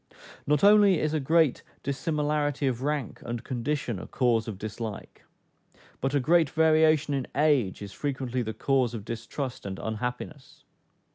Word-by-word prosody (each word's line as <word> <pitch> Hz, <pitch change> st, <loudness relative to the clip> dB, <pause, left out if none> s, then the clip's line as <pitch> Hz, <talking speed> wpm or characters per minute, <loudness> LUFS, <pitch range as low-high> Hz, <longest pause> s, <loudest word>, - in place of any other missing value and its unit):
Not 150 Hz, 0 st, +2 dB
only 205 Hz, -4 st, +6 dB
is 155 Hz, 0 st, -1 dB
a 155 Hz, -, +1 dB
great 160 Hz, 0 st, +2 dB, 0.2 s
dissimilarity 145 Hz, +1 st, -1 dB
of 125 Hz, -2 st, -1 dB
rank 145 Hz, -3 st, -2 dB
and 120 Hz, -1 st, -5 dB
condition 125 Hz, -3 st, -2 dB
a -, -, -8 dB
cause 120 Hz, -3 st, +1 dB
of 105 Hz, -4 st, -5 dB
dislike, 110 Hz, +1 st, -7 dB, 0.7 s
but 135 Hz, +2 st, -1 dB
a -, -, +4 dB
great 160 Hz, +3 st, +3 dB
variation 155 Hz, -1 st, +3 dB
in 135 Hz, -2 st, -2 dB
age 140 Hz, -10 st, +2 dB
is 100 Hz, -, -8 dB
frequently 130 Hz, -1 st, -3 dB
the 110 Hz, -2 st, -4 dB
cause 130 Hz, -1 st, +1 dB
of 105 Hz, -3 st, -7 dB
distrust 115 Hz, +3 st, -5 dB
and 95 Hz, -1 st, -5 dB
unhappiness. 125 Hz, +6 st, -5 dB
135 Hz, 150 wpm, -27 LUFS, 115-150 Hz, 0.7 s, only